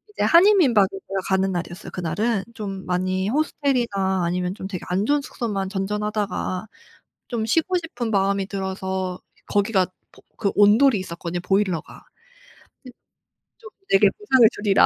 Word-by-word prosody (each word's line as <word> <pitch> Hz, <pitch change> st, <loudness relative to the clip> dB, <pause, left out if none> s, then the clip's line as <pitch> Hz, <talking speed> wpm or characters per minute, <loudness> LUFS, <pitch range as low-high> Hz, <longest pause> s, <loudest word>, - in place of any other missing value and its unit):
이제 -, -, -1 dB
한인 395 Hz, +5 st, +6 dB
민박에 230 Hz, -, +4 dB
제가 195 Hz, 0 st, -5 dB
가는 190 Hz, 0 st, +2 dB
날이었어요 175 Hz, +1 st, -5 dB
그날은. 195 Hz, +4 st, -1 dB
좀 195 Hz, -3 st, -6 dB
많이 185 Hz, +2 st, -1 dB
호스텔이나 235 Hz, -, 0 dB
아니면 180 Hz, +1 st, -1 dB
좀 190 Hz, -, -6 dB
되게 185 Hz, -3 st, -6 dB
안 185 Hz, +3 st, 0 dB
좋은 290 Hz, +3 st, +2 dB
숙소만 200 Hz, -8 st, -3 dB
전전하다가 210 Hz, -1 st, -2 dB, 0.6 s
좀 230 Hz, -3 st, -2 dB
쉬고 325 Hz, -, +1 dB
싶은 245 Hz, -9 st, -4 dB
마음이 195 Hz, -1 st, +1 dB
들어서 190 Hz, -2 st, -3 dB, 0.3 s
거기가 200 Hz, -2 st, +2 dB
보 185 Hz, -, -23 dB, 0.2 s
그 200 Hz, -3 st, 0 dB
온돌이 210 Hz, +3 st, +5 dB
있었거든요 175 Hz, -1 st, -5 dB
보일러가. 190 Hz, -3 st, -1 dB, 0.8 s
그 255 Hz, -, -10 dB, 0.7 s
좀 450 Hz, -1 st, -12 dB, 0.2 s
'내게 390 Hz, 0 st, +5 dB
보상을 265 Hz, -, +4 dB
주리라.' 205 Hz, -2 st, +3 dB
200 Hz, 330 characters per minute, -23 LUFS, 190-230 Hz, 0.8 s, 한인